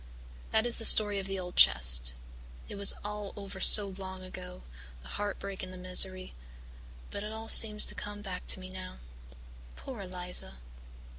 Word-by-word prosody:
"That 220 +1 0
is 240 - 0
the 225 - -6
story 210 -2 +4
of 195 - -6
the 195 0 -5
old 180 -1 -8
chest. - - +4 0.5
It - - -9
was 200 0 +4
all 210 -1 -7
over 200 -2 -10
so 200 +1 +7
long 190 -1 -10
ago 180 0 -11 0.4
the - - -13
heartbreak 200 -1 -6
and 185 - -8
the 185 - -11
misery 185 +1 +2 0.8
but 200 - -7
it 210 - -7
all 220 0 -9
seems 210 -1 +4
to - - -4
come 205 0 -8
back 185 -2 -7
to - - +2
me 185 0 -11
now. 185 0 -10 0.8
Poor 255 -6 -10
Eliza!" 180 - -5
190 Hz, 170 wpm, -29 LUFS, 185-205 Hz, 0.8 s, so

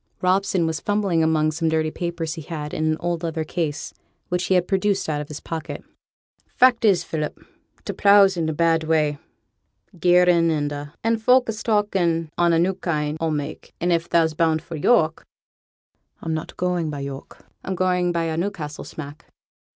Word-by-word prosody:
Robson 185 -1 +2
was 160 -1 -2
fumbling 205 -5 0
among 155 -1 +2
some 160 +1 -1
dirty 160 0 0
papers 170 -2 -3
he 165 - -7
had 150 -1 -6
in 155 - -1
an 155 0 +1
old 175 -1 -2
leather 165 -2 -2
case, 160 -1 -3 0.4
which 180 0 -1
he 190 - +2
had 180 -1 +2
produced 195 0 0
out 150 -2 -1
of 150 - -7
his 150 0 -7
pocket. 160 -1 -6 0.7
'Fact 250 -2 +4
is, 185 -5 +4
Philip, 155 -2 -4 0.5
t' - - -3
pleugh's 200 -1 +5
in 165 -2 -1
a - - -1
bad 165 +1 +2
way, 155 -2 +1 0.8
gearin' 175 -1 +4
and 145 -2 0
a', 145 +1 -7
an' 225 0 +2
folk 250 +3 +4
is 220 0 -4
talkin' 185 -7 0
on 175 -1 +3
a 165 - +3
new 180 +3 +2
kind 155 -5 -2
o' 165 - +1
mak'; 150 -1 -5
and 175 +1 +1
if 170 0 -1
thou's 165 -2 +3
bound 160 0 +1
for 165 - -7
York 160 -1 +2 0.5
' - - -47
'I'm 160 - -2
not 155 - -5
going 180 -3 -1
by 145 -2 -5
York; 140 0 -8 0.2
I'm 190 - -3
going 180 -1 +1
by 170 -1 -1
a 160 -1 -2
Newcastle 170 -5 -4
smack.' 150 +1 -9
165 Hz, 190 wpm, -23 LUFS, 155-180 Hz, 0.8 s, pleugh's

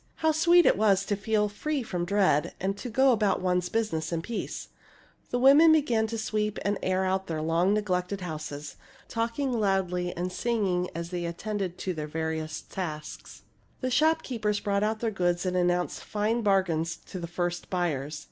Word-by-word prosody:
How 320 0 +2
sweet 340 +3 +5
it - - +4
was 200 -2 +3
to 205 - 0
feel 210 +1 +1
free 280 +7 -3
from 180 -5 -3
dread, 185 -6 +2
and 195 +1 -1
to 245 +5 -6
go 265 +4 +4
about 210 -5 +2
one's 180 -1 0
business 175 -8 -1
in 165 -1 -2
peace! 230 +3 -5 0.6
The 245 - 0
women 280 +6 +7
began 240 -8 +2
to 230 +1 -4
sweep 215 -1 -1
and 200 0 0
air 185 0 +1 0.2
their 160 -2 -2
long 170 +5 +2
neglected 190 -2 -1
houses, 150 -3 -6 0.3
talking 235 +4 -1
loudly 190 -5 0
and 180 +1 -2
singing 190 -5 0
as 170 +1 -5
they 175 -1 -3
attended 185 +1 -3
to 185 - -3
their 155 -2 -4
various 160 0 -3
tasks. 155 -5 -7 0.4
The 255 -1 -1
shopkeepers 250 -9 +1
brought 200 -1 0
out 215 +1 0
their 230 -2 0
goods 175 -2 0
and 180 0 -1
announced 180 0 0
fine 215 +3 0
bargains 175 -6 +1
to 185 - -7
the 170 - -5
first 175 +1 -3
buyers. 155 -5 -2
195 Hz, 175 wpm, -28 LUFS, 175-220 Hz, 0.6 s, women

